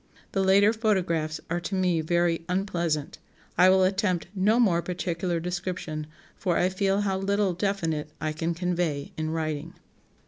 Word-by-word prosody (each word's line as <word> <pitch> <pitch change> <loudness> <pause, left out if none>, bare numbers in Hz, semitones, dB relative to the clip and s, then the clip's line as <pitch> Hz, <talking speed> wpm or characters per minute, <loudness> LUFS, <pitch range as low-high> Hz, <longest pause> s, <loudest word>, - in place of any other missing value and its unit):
The 195 - +1
later 200 +3 +5
photographs 175 -8 0
are 170 +1 -1
to 190 +3 -4
me 180 -3 +2
very 170 +1 +1
unpleasant. 170 -6 -1 0.4
I 185 - +6
will 190 0 +5
attempt 185 -2 +1
no 210 +4 +3
more 180 -8 +4
particular 175 -1 -2
description, 175 -3 -4 0.3
for 180 -3 0
I 180 - +3
feel 195 +1 +1
how 195 -2 0
little 200 -1 +1
definite 165 -5 -1
I 155 - -1
can 165 +2 -2
convey 170 -5 -1
in 155 0 -2
writing." 160 0 -3
180 Hz, 150 wpm, -27 LUFS, 165-195 Hz, 0.4 s, I